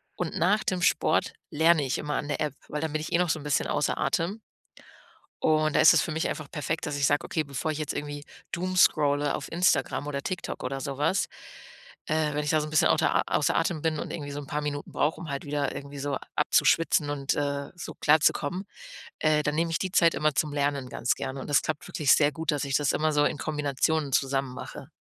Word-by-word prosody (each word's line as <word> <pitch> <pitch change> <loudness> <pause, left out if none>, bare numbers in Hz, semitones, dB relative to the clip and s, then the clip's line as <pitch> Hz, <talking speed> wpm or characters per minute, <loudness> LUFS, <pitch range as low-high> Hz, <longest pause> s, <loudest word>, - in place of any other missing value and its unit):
und 175 -3 -3
nach 195 +6 +2
dem 185 -1 -1
Sport - - +2 0.2
lerne 160 -1 +4
ich 130 - -1
immer 150 0 -3
an 145 - -2
der 145 - -2
App, 150 -3 -1
weil 150 - -3
da 160 - 0
bin 155 0 -3
ich 155 - -5
eh - - +5
noch 180 -1 +1
so 155 - 0
'n - - -10
bisschen 150 -2 0
außer 145 - 0
Atem. 185 +7 -1 1.0
Und 155 -1 +2
da - - +4
ist - - +8
es - - +4
für - - -3
mich 160 +1 -1
einfach 155 -2 -5
perfekt, 155 +1 -3
dass 145 -1 -3
ich 140 - +2
sage: 145 +2 +2
„Okay, 160 - -1
bevor 140 +2 -3
ich 150 - -4
jetzt 155 -2 -3
irgendwie 145 0 -5 0.3
Doomscrolle 155 -5 +2
auf - - -7
Instagram 160 -5 +1
oder 140 -1 -3
TikTok 180 +3 -5
oder 135 +2 -3
sowas, 145 +7 0 0.8
äh, 155 -1 0
wenn 150 - -1
ich 145 - 0
da 155 -1 +3
so 150 - -4
'n - - -7
bisschen 155 - +4
auter - - +3
außer - - +1
Atem 160 -3 0
bin 160 -1 0
und - - -5
irgendwie 145 -3 -5
so 145 - -5
'n 140 - -9
paar 150 0 -2
Minuten 145 -1 -4
brauche, 150 +2 0
um 165 - -7
halt 140 -1 -4
wieder 145 0 -1
irgendwie 140 0 -8
so 140 -1 -2 0.2
abzuschwitzen 160 -3 +3
und, 140 -1 -1
äh, 140 -1 -2
so 175 - -8
klar 155 +1 +4
zu - - +6
kommen, 180 +7 -4 0.5
äh, 155 -1 +2
dann 150 0 -1
nehme 165 +1 0
ich 160 - 0
die 190 - -2
Zeit 170 -2 +4
immer 155 -1 +1
zum 150 +1 0
Lernen 140 -2 -1
ganz 120 - 0
gerne.” 130 +1 -5
Und - - -8
das 145 - +4
klappt 155 -1 -4
wirklich 150 -7 +1
sehr 145 -1 +4
gut, 160 +2 -2
dass 145 -2 -1
ich 140 0 -1
das 145 -2 +2
immer 155 0 +1
so 145 0 +3
in - - 0
Kombination 150 0 -1
zusammen 135 -1 0
mache. - - -8
150 Hz, 240 wpm, -27 LUFS, 145-160 Hz, 1.0 s, ist